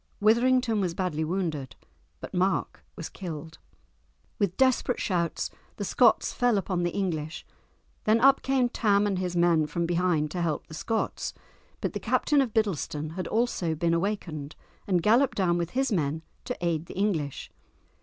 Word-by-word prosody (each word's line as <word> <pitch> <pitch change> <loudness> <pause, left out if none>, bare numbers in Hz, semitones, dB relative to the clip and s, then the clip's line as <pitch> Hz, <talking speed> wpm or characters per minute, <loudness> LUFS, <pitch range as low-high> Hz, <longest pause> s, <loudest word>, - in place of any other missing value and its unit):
Withrington 235 +1 +3
was 175 -3 -1
badly 175 -5 -1
wounded, 160 -6 -2 0.5
but - - -8
Mark 185 -2 0
was 165 - -5
killed. 160 -3 -7 0.8
With 195 -3 0
desperate 260 -1 +2
shouts 170 -3 -1 0.2
the - - -4
Scots - - +3
fell 245 -3 +2
upon 185 -2 -1
the 175 - +1
English; 165 -5 -3 0.6
then 220 +2 +4
up 275 +3 +5
came 265 -2 +2
Tam 205 -4 +2
and 195 -3 0
his 180 -1 -2
men 170 -3 +3
from 170 +3 -1
behind 170 -3 +1
to 180 - -2
help 160 -3 -1
the - - -13
Scots, 220 +8 -2 0.5
but - - -2
the - - -3
Captain 295 -2 +2
of 255 -4 -1
Biddleston 160 -8 -1
had 185 +2 -4
also 215 -8 0
been 165 +2 +1
awakened, 170 -5 -2 0.3
and 180 -4 +2
galloped 235 +6 +4
down 175 -3 +2
with 170 -1 -2
his 270 -1 +1
men 160 -4 0 0.2
to 250 - -3
aid 165 -1 -1
the - - -9
English. 165 -9 -1
180 Hz, 165 wpm, -27 LUFS, 165-215 Hz, 0.8 s, up